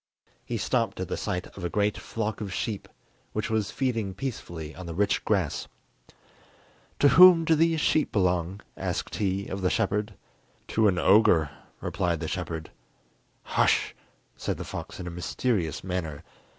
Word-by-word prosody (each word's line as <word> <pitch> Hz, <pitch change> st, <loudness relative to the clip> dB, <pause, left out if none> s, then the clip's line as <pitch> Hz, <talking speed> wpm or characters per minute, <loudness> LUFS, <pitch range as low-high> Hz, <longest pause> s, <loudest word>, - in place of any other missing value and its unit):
He -, -, -3 dB
stopped -, -, 0 dB
at -, -, -3 dB
the -, -, -1 dB
sight 90 Hz, +1 st, -3 dB
of 95 Hz, -, -8 dB
a 85 Hz, -, -1 dB
great 105 Hz, +2 st, +1 dB
flock 110 Hz, -1 st, -4 dB
of 100 Hz, -3 st, -4 dB
sheep, 105 Hz, +2 st, -3 dB, 0.5 s
which 110 Hz, +1 st, -2 dB
was 110 Hz, -2 st, +1 dB
feeding 115 Hz, -5 st, -1 dB
peacefully 85 Hz, -, -5 dB
on 90 Hz, -1 st, -8 dB
the 85 Hz, -, -5 dB
rich 100 Hz, +2 st, +1 dB
grass. -, -, 0 dB, 1.3 s
"To 145 Hz, -, +5 dB
whom 170 Hz, +3 st, +8 dB
do 160 Hz, -, +4 dB
these 165 Hz, +1 st, +3 dB
sheep 155 Hz, -, +2 dB
belong?" 90 Hz, -1 st, 0 dB
asked -, -, -3 dB
he 100 Hz, -1 st, 0 dB
of 95 Hz, +1 st, -4 dB
the 90 Hz, -, +2 dB
shepherd. 105 Hz, +2 st, 0 dB, 0.5 s
"To 110 Hz, -1 st, +3 dB
an 95 Hz, -3 st, +2 dB
ogre," 85 Hz, -5 st, +5 dB, 0.3 s
replied 85 Hz, -2 st, -1 dB
the 80 Hz, -, -3 dB
shepherd. 80 Hz, -2 st, -4 dB, 0.7 s
"Hush," -, -, +2 dB, 0.4 s
said -, -, -3 dB
the -, -, -5 dB
fox -, -, -7 dB
in 90 Hz, -, -5 dB
a 85 Hz, -, -4 dB
mysterious 90 Hz, 0 st, -1 dB
manner. 85 Hz, -5 st, -4 dB
100 Hz, 160 wpm, -27 LUFS, 90-110 Hz, 1.3 s, whom